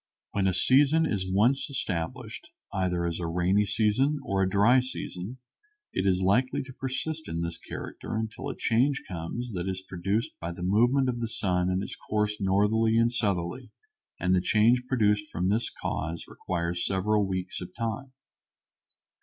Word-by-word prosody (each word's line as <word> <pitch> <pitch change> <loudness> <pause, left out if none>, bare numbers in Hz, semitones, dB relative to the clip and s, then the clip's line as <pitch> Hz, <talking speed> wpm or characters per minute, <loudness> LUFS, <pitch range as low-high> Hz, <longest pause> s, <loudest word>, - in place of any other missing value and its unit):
When 100 -1 +1
a 95 - +2
season 145 +10 +5
is 95 -9 -1
once 120 +10 +2
established, 85 -11 -4 0.2
either 90 -3 0
as 85 0 -2
a 85 - -2
rainy 90 +5 +2
season 110 +8 +2
or 95 0 0
a 95 - +2
dry 105 +7 +5
season, 125 -3 -5 0.6
it 95 - 0
is 95 0 +2
likely 120 +7 +2
to 130 0 -11
persist 155 +5 -4
in 85 +1 -2
this 85 0 -4
character - - -6
until 110 0 -3
a - - -5
change 130 +5 +2
comes 95 +8 -5
that 90 0 -2
is 95 0 -4
produced 95 +5 -1
by 85 +1 -4
the 90 - -7
movement 120 +8 +3
of 120 -1 -1
the 115 - -1
sun 90 -4 0
in 95 +1 0
its - - -6
course 105 0 -1
northerly 105 +4 +3
and 115 +1 +3
southerly, 100 +2 -1 0.5
and 90 +1 +2
the 90 - +4
change 115 +6 +3
produced 105 -5 +2
from 90 +2 0
this 110 +4 +1
cause 85 +2 -4
requires 85 -1 -3
several 100 +2 +1
weeks 95 -1 -3
of 90 0 -8
time. 120 +3 -4
105 Hz, 170 wpm, -28 LUFS, 90-120 Hz, 0.6 s, season